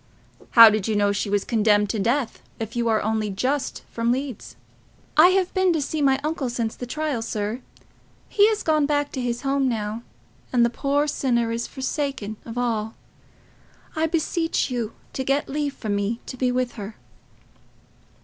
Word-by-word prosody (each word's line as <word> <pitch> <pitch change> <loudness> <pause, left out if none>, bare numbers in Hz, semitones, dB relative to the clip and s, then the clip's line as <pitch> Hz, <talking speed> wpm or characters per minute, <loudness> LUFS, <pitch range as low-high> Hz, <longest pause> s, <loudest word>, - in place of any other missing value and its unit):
"How 230 -1 +11
did 215 -1 -1
you 220 - 0
know 205 0 +3
she 200 +1 -2
was 205 -1 +1
condemned 210 -3 +2
to 220 - -2
death, 240 +5 0 0.2
if 225 +1 -5
you 235 -1 0
are 220 -1 +2
only 215 0 0
just 255 +8 -2
come - - -32
from 230 +1 +1
Leeds?" 260 -2 -4 0.6
"I 310 +3 +8
have 370 -1 -2 0.3
seen 295 +1 -1
my 265 0 +3
uncle 300 -4 -2
since 230 -2 -2
the 245 - -7
trial, 300 -2 -2
sir. 220 +1 -3 0.7
He 405 - -2
is 435 -1 +1
gone 305 -2 +2
back 290 -1 0
to 260 - -4
his 240 0 -2
home 275 -1 +1
now, 220 -1 -3 0.5
and 240 -2 +4
the 235 - 0
poor 285 +3 0
sinner 240 -5 0
is 230 +1 -2
forsaken 265 -6 -3
of 230 +1 -7
all. 225 -3 -1 1.0
I 320 +1 +1
beseech 325 -2 0
you 235 -3 -2 0.2
to 265 - -2
get 275 +2 0
leave 285 0 -2
for 220 - -6
me 205 +3 -1
to - - -7
be 255 0 0
with 250 0 0
her." 205 +2 -7
245 Hz, 180 wpm, -24 LUFS, 220-280 Hz, 1.0 s, How